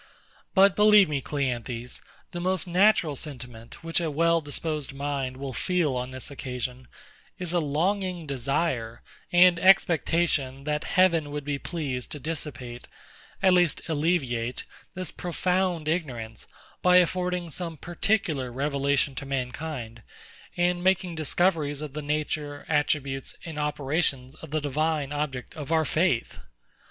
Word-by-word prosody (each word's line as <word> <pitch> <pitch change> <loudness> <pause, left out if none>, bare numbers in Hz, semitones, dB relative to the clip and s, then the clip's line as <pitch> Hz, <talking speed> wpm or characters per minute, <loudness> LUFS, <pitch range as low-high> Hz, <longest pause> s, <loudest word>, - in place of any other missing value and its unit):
But 195 0 +6
believe 210 -1 +7
me, 145 -2 -1
CLEANTHES, 125 -4 -3 0.3
the 175 - -5
most 185 -1 0
natural 185 -3 +3
sentiment 125 -3 -8
which 165 +1 0
a 165 - -1
well 165 +2 +3
disposed 150 -1 -3
mind 140 -2 -3
will 135 -1 -5
feel 165 +1 +1
on 125 0 -2
this 130 +2 -6
occasion, 125 -1 -5 0.5
is 180 -2 -3
a 175 - +3
longing 175 +3 0
desire 135 -3 -1 0.3
and 175 -1 +6
expectation 165 -7 +3
that 150 +1 -1
Heaven 170 -5 +4
would 145 0 -4
be 145 -1 -2
pleased 135 -8 -4
to 150 - -6
dissipate, 135 -6 -5 0.6
at 190 -1 +6
least 175 -3 +3
alleviate, 145 -7 0 0.3
this 185 -1 -4
profound 180 -2 -1
ignorance, 125 -10 -3 0.3
by 180 0 +5
affording 180 -1 +1
some 170 +2 -4
more - - -15
particular 165 - -1
revelation 140 +1 +1
to 130 - -6
mankind, 125 -3 -4 0.6
and 175 0 +1
making 185 -1 +2
discoveries 160 -2 +1
of 150 -3 -6
the 150 - -4
nature, 150 0 -2
attributes, 145 -3 0
and 160 -3 -5
operations 145 -2 -1
of 160 0 -11
the 155 +1 -1
Divine 150 0 0
object 140 -4 -3
of 155 -1 -6
our 160 -1 +3
faith. 155 - +1
150 Hz, 135 wpm, -27 LUFS, 135-175 Hz, 0.6 s, believe